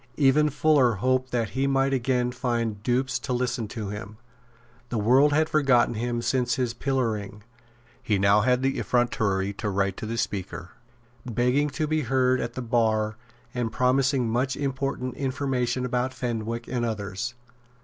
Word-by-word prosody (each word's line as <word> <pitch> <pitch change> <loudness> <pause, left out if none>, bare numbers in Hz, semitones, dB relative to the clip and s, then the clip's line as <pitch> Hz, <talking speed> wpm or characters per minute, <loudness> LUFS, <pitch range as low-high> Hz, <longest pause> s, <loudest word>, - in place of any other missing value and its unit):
Even 150 +1 +4
Fuller 145 -4 +3
hoped 130 +5 0
that 115 -3 0
he 135 +2 0
might 135 0 +2
again 125 -1 +1
find 120 -4 -2
dupes 130 +3 0
to 125 - -3
listen 120 -2 -1
to 105 -2 -5
him. 105 +1 -7 0.7
The 120 - -2
world 130 +7 +4
had 155 +2 +3
forgotten 135 -7 +3
him 120 +1 -2
since 125 -2 +1
his 125 -3 -1
pillorying. 110 -6 -2 0.6
He 105 - +1
now 100 +2 +4
had 125 +3 +2
the 135 0 0
effrontery 100 -5 0
to 105 +1 -3
write 100 -1 0
to 110 - -5
the 115 +1 -3
Speaker, 95 -5 -4 0.5
begging 125 +5 +1
to 155 - +1
be 155 0 0
heard 130 0 +2
at 120 0 -4
the 130 - -4
bar 110 -2 +1 0.4
and 120 -2 -2
promising 130 +1 +2
much 125 +3 0
important 135 -2 -2
information 130 -2 -1
about 125 +1 -1
Fenwick 115 -1 -3
and 120 -1 -2
others. 110 +1 -3
125 Hz, 160 wpm, -26 LUFS, 110-130 Hz, 0.7 s, Even